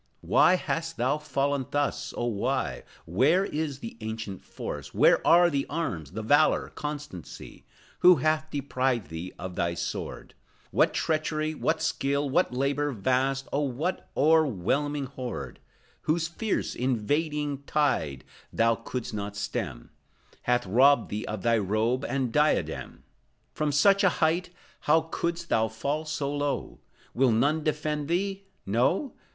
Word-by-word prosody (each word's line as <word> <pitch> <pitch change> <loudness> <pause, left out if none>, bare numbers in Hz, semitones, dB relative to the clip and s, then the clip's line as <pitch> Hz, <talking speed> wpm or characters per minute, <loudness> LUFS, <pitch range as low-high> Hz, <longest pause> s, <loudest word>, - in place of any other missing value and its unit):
Why 185 - +5
hast 165 -2 -3
thou 130 +5 +1
fallen 140 -2 -1
thus, 145 0 -1
oh, 120 - -1
why? 120 +4 -1 0.2
Where 135 - +3
is 150 -5 -3
the 115 - -7
ancient 110 -3 -5
force? - - -7
Where - - +5
are 175 +1 +6
the 140 -1 -1
arms, 90 - -3
the 110 +2 -4
valor, 145 +7 +3
constancy? 150 - -7 0.3
Who 180 0 +8
hath 155 +2 0
deprived 130 -6 -1
thee 80 +3 -5
of 90 0 -6
thy 85 -1 -1
sword? - - -5 0.4
What - - +3
treachery, 155 0 0
what 160 +1 -1
skill, 140 +1 0
what 170 +7 +2
labor 140 +3 0
vast, 130 +4 0
Or 140 -1 0
what 155 +9 -3
o'erwhelming 145 - +2
horde 130 -2 -6 0.5
Whose 165 +1 +2
fierce, 200 +5 -2
invading 145 +4 -1
tide, 125 - 0 0.3
thou 115 0 +3
could'st 115 +1 -5
not 100 -1 -4
stem, 100 - -4 0.6
Hath 125 -1 +2
robbed 125 +5 +4
thee 105 +2 -3
of 105 -3 -4
thy 115 -1 +3
robe 110 +6 0
and 130 -2 -1
diadem? 150 +1 0 0.5
From 150 0 0
such 195 +8 +4
a 195 - +6
height 170 +3 +1 0.4
how 160 +2 +6
couldst 170 0 -2
thou 110 0 +3
fall 140 +8 -3
so 145 -2 -2
low? 145 0 -2 0.3
Will 130 0 +3
none 145 +8 +2
defend 150 -1 -1
thee? 195 +3 -1 0.2
No? 130 - +1
140 Hz, 140 wpm, -27 LUFS, 115-155 Hz, 0.6 s, Who